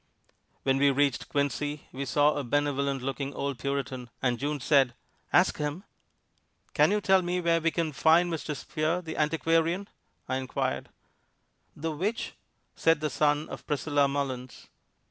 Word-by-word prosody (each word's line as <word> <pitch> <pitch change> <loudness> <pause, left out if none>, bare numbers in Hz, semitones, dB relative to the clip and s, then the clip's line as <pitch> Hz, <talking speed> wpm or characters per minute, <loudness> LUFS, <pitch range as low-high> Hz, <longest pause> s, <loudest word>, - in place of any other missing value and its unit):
When 135 0 +2
we 140 0 +5
reached 140 -1 +1
Quincy 145 +1 -1
we 135 +2 -4
saw 145 +2 +3
a 145 - -2
benevolent 140 0 0
looking 135 +1 -3
old 140 -3 -3
Puritan, 135 -3 -3
and 125 -2 0
June 145 +1 -2
said, 135 -2 +3 0.4
"Ask - - +4
him!" 150 +5 -3 0.9
"Can - - +5
you 210 - +2
tell 190 -1 +4
me 180 0 -1
where 170 -1 +2
we 165 - +3
can 165 -1 -1
find 165 +4 +4
Mr. 155 -1 -3
Spear, 155 +5 -2
the 160 -1 -6
antiquarian?" 165 +4 +1 0.4
I 130 - 0
inquired. 130 -1 -2 0.9
"The 160 +2 -3
which?" 195 +10 -2 0.4
said 165 -2 +3
the 155 0 -2
son 150 0 +1
of - - -9
Priscilla 145 -1 +2
Mullins. 135 -3 -4
145 Hz, 150 wpm, -28 LUFS, 140-165 Hz, 0.9 s, we